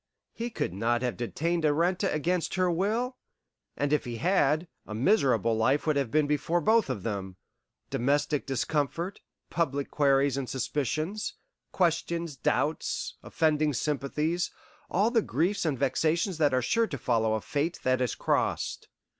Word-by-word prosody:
He 235 +1 -4
could 220 - -3
not 120 +5 0
have 125 -5 -1
detained 165 - -1
Arenta 170 +6 +2
against 165 +3 0
her 185 -1 +2
will, 225 +9 0 0.6
and 145 +1 0
if 150 - +2
he 120 -1 -5
had, 165 0 +2 0.2
a 105 - -5
miserable 120 - +3
life 130 +6 +2
would 155 -2 +2
have 140 -4 0
been 155 +4 +3
before 150 +4 +1
both 220 -1 +3
of 110 -8 -3
them 95 -4 -4 0.6
domestic 145 +3 +1
discomfort, 150 - -1 0.3
public 140 -4 -1
queries 140 -1 +3
and 135 -2 -3
suspicions, 150 - -2 0.4
questions, 170 -2 0
doubts, - - -1
offending 155 -2 +1
sympathies 150 +5 -1 0.4
all 205 +5 +2
the 230 -2 +3
griefs 180 - 0
and 150 -4 0
vexations 160 - +1
that 150 -2 +4
are 130 -1 +1
sure 230 - +2
to 140 - -5
follow 110 -2 +1
a 110 - -2
Fate 150 +4 -1
that 130 0 +2
is 125 - 0
crossed. - - -1
150 Hz, 150 wpm, -28 LUFS, 130-175 Hz, 0.6 s, that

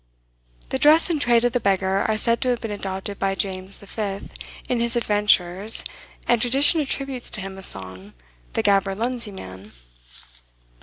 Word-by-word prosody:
The 265 - -1
dress 315 +5 +5
and 305 -4 0
trade 240 -2 +4
of 245 - +1
the 245 - +2
beggar 195 -2 +1
are 220 -1 +1
said 230 +2 +1
to 255 - +1
have 245 -1 +1
been 225 - -5
adopted 195 0 -5
by 195 0 0
James 190 0 -4
V. 200 -1 -4 0.5
in 250 - 0
his 235 +1 -1
adventures, 205 -2 +2 0.4
and 240 -2 +3
tradition 275 +6 +3
attributes 270 -3 -3
to 215 - -4
him 190 0 -6
a 195 - -9
song, 95 - -4 0.4
"The - - 0
Gaberlunzie 205 +4 +1
Man." 95 - -10
210 Hz, 160 wpm, -23 LUFS, 190-240 Hz, 0.5 s, dress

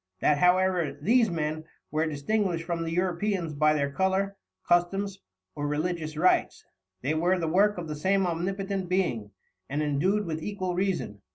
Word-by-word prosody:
That 145 -1 +3
however, 180 -4 +3
these 225 - +3
Men, 155 -2 -2 0.3
were 155 +1 +1
distinguished 170 +3 -1
from 170 0 -3
the 165 0 -3
Europeans 180 -1 -1
by 155 +1 +3
their 140 -1 0
Colour, 190 +4 0 0.3
Customs, 195 +3 +1 0.3
or 145 - -3
religious 155 +1 -2
Rites, 180 +4 +2 0.4
they 145 +4 +1
were 175 +4 +2
the 165 -2 -2
Work 200 +5 +3
of 170 -2 -5
the 155 - -3
same 190 +5 +1
omnipotent 190 +2 -2
Being, 165 - 0 0.4
and 145 +2 -1
endued 185 +9 +1
with 160 -2 -3
equal 185 -1 -3
Reason. 180 - -2
175 Hz, 160 wpm, -27 LUFS, 155-190 Hz, 0.4 s, That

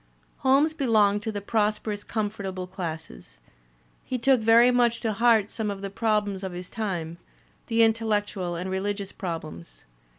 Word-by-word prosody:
Holmes 280 +4 +3
belonged 215 -8 +2
to 220 +1 -3
the 205 -1 -4
prosperous 210 0 -1
comfortable 200 -4 -3
classes. 165 - -7 0.7
He 255 - -3
took 255 0 +3
very 230 +3 +6
much 240 -1 +2
to 220 -2 -1
heart 225 -1 +3
some 220 -2 -3
of 200 -1 -5
the 195 - -4
problems 205 -2 0
of 190 -2 -4
his 180 +1 -8
time, 175 -7 -4 0.5
the 230 -1 +3
intellectual 210 -5 0
and 180 +2 -4
religious 200 +1 -2
problems. 155 - -7
205 Hz, 145 wpm, -26 LUFS, 190-225 Hz, 0.7 s, very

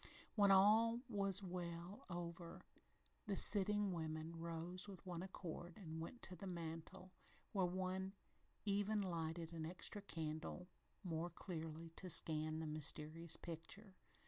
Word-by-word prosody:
When 205 -2 +5
all 220 +4 +6
was 200 -3 +2
well 175 0 -5
over, 170 -1 -6 0.6
the 200 - 0
sitting 205 0 +7
women 160 -1 -3
rose 170 +3 -5
with 195 -2 -10
one 175 -2 -4
accord 175 -2 -6
and 160 -5 -6
went 235 +9 -7
to 185 - 0
the 195 +3 -7
mantel, 170 +2 -6 0.4
where 190 -3 +2
one 185 +1 -2 0.5
even 205 +1 +1
lighted 165 -2 -3
an 165 -1 -4
extra 185 +4 -2
candle 165 0 -4 0.4
more 170 -1 -2
clearly 165 -1 -6
to 185 - -4
scan 155 -1 +4
the 160 - -3
mysterious 155 +2 0
picture. 175 +5 -7
175 Hz, 130 wpm, -42 LUFS, 165-195 Hz, 0.6 s, sitting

